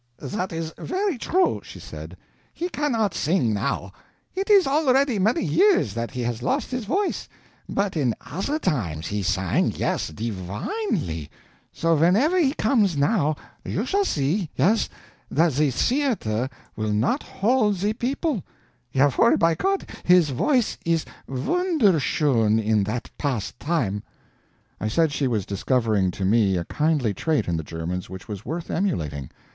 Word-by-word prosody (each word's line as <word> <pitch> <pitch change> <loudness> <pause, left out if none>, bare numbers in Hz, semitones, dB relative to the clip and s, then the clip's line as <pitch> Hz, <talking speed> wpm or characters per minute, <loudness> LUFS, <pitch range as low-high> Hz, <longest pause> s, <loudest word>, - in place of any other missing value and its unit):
"That 190 -2 -4
is 165 -1 -4
very 375 -6 -1
true," 370 +9 +1
she - - -11
said; - - -9 0.4
"he 350 +2 -2
cannot 245 - 0
sing 145 - +1
now; 100 +1 -2 0.4
it 385 +2 -3
is 400 -3 +7
already 270 -4 +2
many 220 - +2
years 380 - +3
that 115 +1 -3
he 125 - -5
has 120 -1 -2
lost 130 - -1
his 250 -3 -3
voice, 385 - -1 0.4
but 200 -2 -1
in 130 -7 +1
other 195 - -3
times 85 - -1
he 105 +4 -2
sang, 95 -1 +1
yes, - - -1
divinely! 100 - -3 0.4
So 165 0 +1
whenever 210 - +3
he 290 -3 +2
comes 215 - +2
now, 155 0 +2 0.3
you 210 - -2
shall 400 +9 +2
see, 160 - 0
yes, 215 +5 +2 0.4
that 160 0 +2
the 145 +2 +2
theater 135 - 0 0.3
will 110 -1 -1
not 105 +4 +1
hold 210 -2 +1
the 205 +4 0
people. 255 - -1 0.5
JAWOHL 145 - +4
BEI 165 0 +3
GOTT! 390 - 0 0.2
his 175 -5 +5
voice 245 - +1
is 165 -1 +1 0.2
WUNDERSCHOEN 150 - +2
in 110 -2 +2
that 110 +4 -4
past 115 - -2
time." 125 - -1 0.8
I 105 - -2
said 160 +8 +2
she 140 -2 0
was 110 -6 -1
discovering 105 -2 +1
to 95 +1 -3
me 100 -2 +3
a 85 - -2
kindly 150 - +1
trait 155 - 0
in 85 - 0
the 80 - -2
Germans 85 +3 -5
which 95 0 -9
was 105 -1 -6
worth 165 +5 -5
emulating. 75 - -2
155 Hz, 150 wpm, -24 LUFS, -, 0.8 s, is